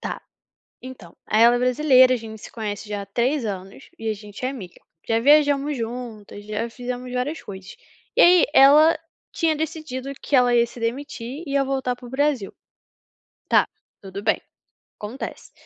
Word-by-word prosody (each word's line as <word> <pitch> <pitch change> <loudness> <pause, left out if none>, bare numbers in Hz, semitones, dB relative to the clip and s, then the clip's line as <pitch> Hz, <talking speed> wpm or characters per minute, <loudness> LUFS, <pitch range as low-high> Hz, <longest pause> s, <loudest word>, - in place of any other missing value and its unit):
Tá. - - -5 0.6
Então, 240 -10 -11
aí 215 +1 +3
ela 240 +1 +6
é 245 - 0
brasileira, 255 0 +5
a 250 - +1
gente 220 -1 -10
se - - -11
conhece 215 -1 -5
já 205 -1 -3
há - - -8
3 240 +6 0
anos 195 -1 -7
e 225 0 -3
a - - 0
gente 210 +3 -8
é - - 0
amiga. 205 -10 -9 0.3
Já 225 0 +2
viajamos 290 +1 +3
juntas, 225 -3 -7
já 215 +2 -3
fizemos 250 +1 -6
várias 265 +6 -2
coisas. 190 -2 -10 0.4
E - - +5
aí, 355 0 +7
ela 300 +4 +7 0.3
tinha 325 -2 +1
decidido 305 -4 -5
que 285 - 0
ela 245 -1 +4
ia 235 0 +4
se 235 +1 -12
demitir, 255 +3 -4
e 280 0 0
ai 275 - +1
voltar 265 -2 -1
para 245 - -12
o - - -11
Brasil. 265 -6 -1 1.0
Tá, - - +4 0.3
tudo 195 0 -8
bem, 220 - +1 0.6
acontece. 220 +6 -7
245 Hz, 175 wpm, -23 LUFS, 220-275 Hz, 1.0 s, aí